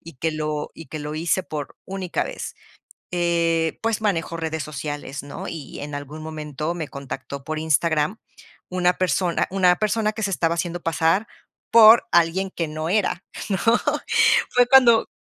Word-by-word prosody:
y 165 -2 -12
que 160 +6 -1
lo 155 -1 -3
y 165 - -11
que 155 +4 -6
lo 150 +1 -5
hice 170 +4 0
por 150 -2 -6
única 190 -2 -3
vez. - - -6 0.6
Eh, 170 -2 +1
pues 225 -1 0
manejo 170 -6 -1
redes 160 -1 -3
sociales, 145 -1 -5
¿no?, 140 0 -7
y, 160 -4 -7
en 145 0 -6
algún 145 +2 -7
momento, 155 0 -4
me 160 -4 -5
contactó 140 0 -7
por 155 +1 -3
Instagram 160 +3 +1 0.5
una 180 0 +2
persona 180 0 0
una 185 -2 +4
persona 215 +1 0
que 220 - -6
se 205 - 0
estaba 170 -2 +1
haciendo 175 0 -3
pasar 165 +6 +1 0.4
por 230 0 +8
alguien 175 +3 +2
que 165 -3 -3
no 155 +1 -4
era, 190 -1 0 0.3
¿no? 190 - +1 0.9
Fue 245 0 +4
cuando 250 -4 +6
165 Hz, 160 wpm, -23 LUFS, 155-190 Hz, 0.9 s, por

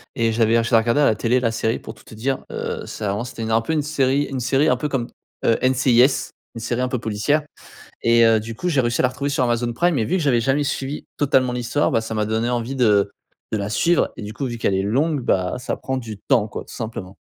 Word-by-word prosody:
et 115 -3 +1
j'avais 115 0 +3
ah 115 - +2
je 115 - -4
la 115 - +6
regardais 115 +6 +1
à - - +5
la - - +4
télé 120 +4 +1
la 115 -2 0
série 115 0 -1
pour - - -9
tout - - -20
te 110 - -13
dire, 130 +4 -1
heu, - - -4
ça 105 -3 -3
avant, 105 +4 -2
c'était 115 -2 -6
un 110 0 +2
peu 160 +8 -2
une 150 - +1
série 140 -2 +1
une 135 -2 -4
série, 135 +5 +2
un - - +4
peu 150 +4 -2
comme, 125 -4 -1 0.4
heu, 115 - +4
NCIS, 130 0 +3 0.2
une 115 - -6
série 120 +2 -2
un 125 - +1
peu 125 - -2
policière 115 +7 0 0.6
et 115 0 +5
heu, 115 -1 +5
du 110 +1 -7
coup, 180 - -2
j'ai 145 -6 +1
réussi 120 -2 +1
à - - -2
la 125 - +4
retrouver 140 +3 -3
sur 135 -2 +1
Amazon 120 0 0
Prime 170 +4 +1
et 110 - +1
vu 185 - 0
que 175 - 0
j'avais 125 -5 +3
jamais 135 +5 +1
suivi 140 0 -3
totalement 130 -3 +2
l'histoire, 125 +4 0
bah, - - +2
ça 115 0 -5
m'a 105 -1 0
donné 110 +2 -1
envie 120 +2 -2
de 105 -4 +3 0.4
de 110 - 0
la 100 0 -3
suivre 170 +10 +2
et - - -8
du 105 - -6
coup, 140 - -4
vu 120 -2 -4
qu'elle 105 - 0
est 95 - +1
longue, 140 +9 +1
bah, 90 -5 +1
ça 125 - -3
prend 130 0 -3
du 110 -5 -6
temps 120 -6 +3
quoi - - -6
tout - - -13
simplement. 105 -4 -6
120 Hz, 275 wpm, -21 LUFS, 115-135 Hz, 0.6 s, la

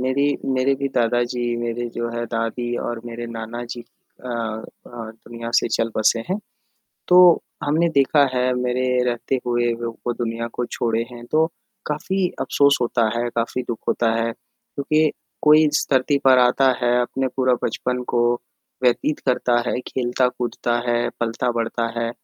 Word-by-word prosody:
मेरी 140 +3 +1 0.2
मेरे 130 +1 +2
भी 140 0 -2
दादा 120 +1 +2
जी, 125 - -3 0.2
मेरे 120 0 -3
जो 120 0 -2
है 120 0 -3
दादी 115 +1 -2
और 120 -1 -3
मेरे 120 0 -6
नाना 115 +1 -6
जी 120 - -5
अ 120 +1 -18
अ, 115 -2 -3 0.2
दुनिया 115 0 -8
से - - +3
चल 115 0 0
बसे 110 +1 +3
हैं 190 +3 0 0.7
तो 180 - +6 0.5
हमने 160 +4 +2
देखा 140 +1 +5
है 125 0 +2
मेरे 125 0 0 0.2
रहते 120 +2 -1
हुए 120 -1 +1
वो 115 +1 -3
दुनिया 115 -1 -3
को 120 - -2
छोड़े 115 -1 -1
हैं, 120 -1 -10
तो 155 +4 +3 0.4
काफ़ी 180 +5 -1
अफ़सोस 140 0 +3
होता 120 -2 +2
है, 120 +1 0
काफ़ी 120 +2 -1
दुःख 115 - -2
होता 115 -1 +2
है 115 0 0
क्योंकि 155 +5 -1 0.3
कोई 155 +1 +7
इस 150 - +1
धरती 135 +2 +3
पर 130 -1 +7
आता 125 +2 +4
है 120 0 +3
अपने 130 +2 -1
पूरा 130 -1 +3
बचपन 125 0 -1
को 120 - +4 0.6
व्यतीत 125 +4 +2
करता 125 -1 +2
है, - - -1
खेलता-कूदता 125 -1 -1
है, 120 0 +1
पलता-बढ़ता 115 0 -1
है 115 0 -1
120 Hz, 160 wpm, -22 LUFS, 115-130 Hz, 0.7 s, कोई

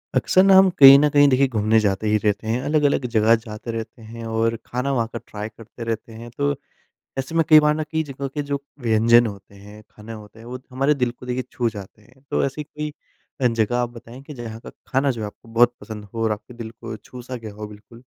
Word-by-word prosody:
अक्सर 185 - +4
ना 195 0 +6
हम 190 0 +7
कहीं 135 -1 +11
न 150 +1 +3
कहीं 145 0 +5
देखिए 135 +1 +3
घूमने 110 -2 +2
जाते 105 0 0
ही 105 - +3
रहते 105 0 -1
हैं। 115 +3 0
अलग-अलग 145 -3 +2
जगह 110 +2 +5
जाते 110 +1 -7
रहते 115 0 -7
हैं। 115 +1 -9
और 115 0 0
खाना 125 +3 -2
वहाँ 120 -4 0
का 115 - -4
ट्राई 105 +1 -6
करते 115 +2 -11
रहते 115 0 -4
हैं। 115 +1 -10
तो 145 0 +1 0.6
ऐसे 135 +5 -4
में 165 - +4
कई 155 0 +9
बार 150 0 +3
ना 155 - -2
कई 160 0 0
जगह 140 -1 -6
के 145 +2 -4
जो 140 -1 -1 0.2
व्यंजन 115 0 +4
होते 100 -1 -10
हैं, 105 +2 -13
खाने 110 +2 -10
होते 105 0 -12
हैं, 115 - -13
वो 125 +1 -7
हमारे 135 +3 +2
दिल 125 -4 -1
को 125 - -14
देखिए 125 +1 -2
छू 120 -2 0
जाते 105 -1 -11
हैं, 130 +5 -24
तो - - +1
ऐसी 140 +2 -4
कोई 150 0 -6 0.5
अ, 125 - +5
जगह 115 0 0
आप 120 -1 0
बताएँ 120 +2 -12
कि 150 - -10
जहाँ 115 -4 -8
का - - -11 0.2
खाना 135 +2 +1
जो 115 -3 -6
है - - -2
आपको 105 - -15
बहुत 120 +1 +4
पसंद 105 -2 -8
हो 115 - -2
और 110 - +1
आपके 105 +3 -6
दिल 115 -2 -7
को 110 - -8
छू 125 +3 -12
सा 125 +1 -7
गया 115 -3 -8
हो? 105 +1 -7
बिल्कुल। 105 +3 -15
115 Hz, 250 wpm, -22 LUFS, 110-135 Hz, 0.6 s, कहीं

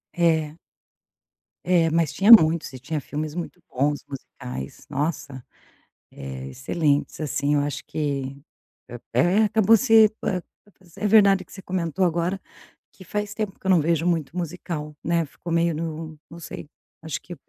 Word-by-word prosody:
É. 160 -3 +1 1.1
É, 175 -2 +3
mas 160 -2 +1
tinha 195 +8 +1
muitos 160 - +7
e 130 - -8
tinha 150 +4 -3
filmes 150 +2 -5
muito 175 0 -6
bons, 145 +3 0
musicais, 65 - -8
nossa, 140 -2 -3 0.7
eh, 65 -1 -7
excelentes 145 - -1
assim 145 0 0
eu 145 - +3
acho 145 -1 -4
que, 140 -3 -3 0.8
é - - +3 0.2
é - - +5
acabou 220 +1 +5
se 225 -3 +6 0.9
é 210 - -1
verdade 200 -3 +5
que - - -20
você 190 - -9
comentou 180 0 -1
agora, 175 +2 0 0.5
que 190 - -15
faz 210 +3 -3
tempo 210 -3 -4
que - - -12
eu 190 - +3
não 180 - +5
vejo 165 +2 +1
muito 165 -1 -1
musical, 160 -3 -5
né, 170 -1 +1
ficou 170 +4 -8
meio 170 -1 +2
no 160 0 -5
não 170 - -10
sei, 165 - -8 0.3
acho 160 -1 -4
que 175 - -9
165 Hz, 155 wpm, -24 LUFS, 145-180 Hz, 1.1 s, muitos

